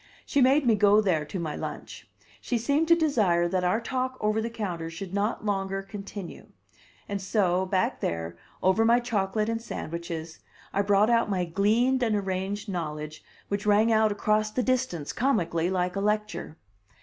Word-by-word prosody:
She 285 - +1
made 270 +3 +4
me 235 - +5
go 205 0 +5
there 175 -8 +1
to 165 +5 -5
my 155 -3 -3
lunch. - - -7 0.3
She 245 - -1
seemed 285 +8 +1
to 335 - +7
desire 215 - +2
that 185 +1 -1
our 180 +5 +2
talk 255 +2 -3
over 215 +1 +1
the 230 - -2
counter 180 -8 -4
should 175 +3 -7
not 205 +2 -1
longer 195 -1 -1
continue. 195 -1 -8 0.6
And 200 -1 -3
so, 190 -2 +1
back 185 0 0
there, 85 0 -3 0.3
over 190 +4 +4
my 235 +2 +5
chocolate 215 -3 -1
and 230 0 -2
sandwiches, 170 -5 -6 0.3
I 200 - +2
brought 205 +2 +3
out 230 -2 +3
my 185 -3 0
gleaned 220 +9 +2
and 225 -3 +2
arranged 195 +1 -2
knowledge 155 -4 -5 0.2
which 200 +1 -3
rang 210 +2 +4
out 220 -1 +4
across 215 +1 +1
the 250 +4 -1
distance, 250 - -1
comically, 175 -10 +1
like 180 -1 -1
a 195 - -1
lecture. 210 -6 -2
205 Hz, 175 wpm, -27 LUFS, 180-225 Hz, 0.6 s, to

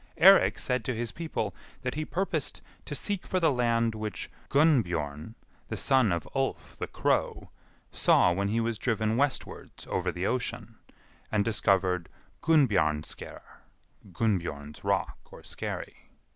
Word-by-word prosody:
Eirik 195 +3 +7
said 125 -2 0
to 130 - -1
his 115 0 -2
people 155 - -3 0.3
that 125 0 -2
he 155 +1 -3
purposed 190 +5 -2 0.2
to - - -4
seek 200 -3 -1
for 185 - +1
the 160 -3 +3
land 115 -2 +1
which 105 -3 -5 0.2
Gunnbjorn, 95 - +1 0.3
the - - -4
son 130 -6 +3
of 85 -1 -2
Ulf 135 0 -2
the - - -4
Crow, - - -1 0.4
saw 90 - +4
when 100 +2 0
he 110 +3 0
was 115 -1 -1
driven 110 -2 0
westwards 140 +2 -2
over - - -1
the 90 +2 -3
ocean, 125 +2 -3 0.5
and 105 -2 +2
discovered 95 -5 +1 0.3
Gunnbjarnarsker 95 - +1 0.7
(Gunnbjorn's 85 -7 -2
rock - - 0
or - - -12
skerry). - - -6
115 Hz, 135 wpm, -29 LUFS, 90-135 Hz, 0.7 s, Eirik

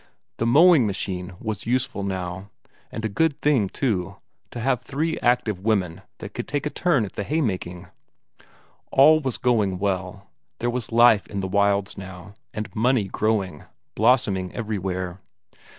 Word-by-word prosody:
The 115 - 0
mowing 150 -1 +6
machine 95 -2 -4
was 110 -2 -5
useful 130 -2 0
now; 95 0 -4 0.4
and 110 - -5
a - - +2
good 150 +8 0
thing, 130 -10 +2
too, 100 -10 -2 0.3
to 120 - -7
have 125 +1 0
three 155 +5 -2
active 120 -6 +1
women 100 -5 0 0.2
that - - -9
could - - -5
take 145 0 -2
a 150 - -2
turn 145 - +1
at 95 - -10
the 100 - -3
haymaking. 95 - -2 1.0
All 155 +3 +6
going 120 -7 0
well; 95 0 -3 0.3
there 120 +1 -1
was 120 -2 -4
life 115 -2 +5
in 100 -2 -4
the 95 - -2
wilds 100 0 +1
now, 95 0 -10 0.2
and 110 0 -6
money 120 +1 +2
growing, 100 -6 -1 0.3
blossoming 95 -8 +2
everywhere. 95 -4 -3
105 Hz, 150 wpm, -24 LUFS, 95-125 Hz, 1.0 s, mowing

